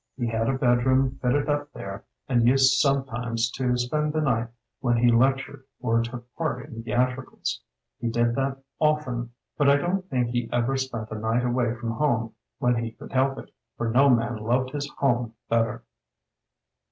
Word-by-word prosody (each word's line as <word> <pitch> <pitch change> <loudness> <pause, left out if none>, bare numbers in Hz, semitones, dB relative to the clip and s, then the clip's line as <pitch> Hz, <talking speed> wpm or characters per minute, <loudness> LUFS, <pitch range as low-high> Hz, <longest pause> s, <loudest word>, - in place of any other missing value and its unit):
He 120 - -1
had 115 0 0
a 135 - +1
bedroom 130 +1 +2
fitted 135 +3 +1
up 145 0 -1
there 100 0 -7 0.2
and 120 -3 +3
used 135 +1 +5
sometimes 120 -4 0
to 125 -2 0
spend 150 +5 0
the 155 - +1
night 120 -5 +1 0.3
when 120 -2 +1
he 120 +1 +4
lectured 135 +3 +1 0.2
or 115 -1 +2
took 120 +1 -6
part 160 -3 -2
in 115 -6 -8
theatricals. 125 +3 -2 0.4
He 120 - -1
did 120 +1 +1
that 135 +2 -1 0.2
often, 135 -6 0 0.3
but 145 -1 +5
I 140 - +6
don't 185 +5 -1
think 125 -4 0
he 120 -1 -1
ever 120 +2 +1
spent 120 -5 -3
a 110 - -4
night 115 +3 0
away 120 -1 +1
from 120 -1 -4
home 115 -4 0 0.2
when 125 -1 +2
he 115 -1 -5
could - - -12
help 135 0 +2
it, - - -10 0.2
for 115 - -1
no 135 +4 +5
man 120 -1 +2
loved 125 +4 0
his 145 0 -3
home 120 -4 +1
better. 115 0 0
125 Hz, 175 wpm, -26 LUFS, 115-135 Hz, 0.4 s, I